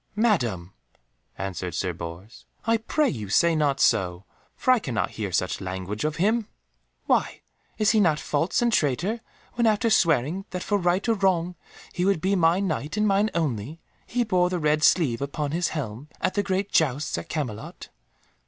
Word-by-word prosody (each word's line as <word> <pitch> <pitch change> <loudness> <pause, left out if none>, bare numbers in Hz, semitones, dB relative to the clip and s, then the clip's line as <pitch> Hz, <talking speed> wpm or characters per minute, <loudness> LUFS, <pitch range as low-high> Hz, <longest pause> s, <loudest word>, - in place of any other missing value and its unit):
"Madam," 120 - 0 0.6
answered 90 -3 -4
Sir 90 0 -1
Bors, 85 +6 -9 0.2
"I 230 0 +3
pray 290 +7 0
you 105 -7 -4
say 170 - +3
not 145 -3 +1
so, 95 -6 +2 0.3
for 255 - +2
I 255 - +5
cannot 125 - -2
hear 105 -4 -4
such 90 +3 -1
language 95 +2 -4
of 155 0 -1
him." 215 +5 +1 0.6
"Why, - - +1 0.4
is 215 -1 +3
he 220 - +3
not 165 -7 +3
false 165 +10 0
and 235 -1 +2
a - - +6
traitor 175 - 0 0.3
when, 235 -1 +2
after 220 +1 +2
swearing 165 - +2
that 180 -1 -4
for 205 -1 0
right 180 +4 +1
or 230 - +4
wrong 185 -4 +1 0.4
he 180 - -1
would 195 -2 +2
be 190 +4 +1
my 170 0 +3
Knight 160 -3 -2
and 210 0 +2
mine 200 +2 +2
only, 145 -2 -2 0.3
he 245 0 0
bore 180 -5 +2
the 180 - -1
red 150 -1 +1
sleeve 140 -7 +3
upon 140 +1 -3
his 175 +2 0
helm 135 -2 -5
at - - 0
the 205 - +1
great 195 0 -2
jousts 145 -2 +1
at 85 - -10
Camelot?" 120 -9 -5
165 Hz, 180 wpm, -25 LUFS, 120-200 Hz, 0.6 s, a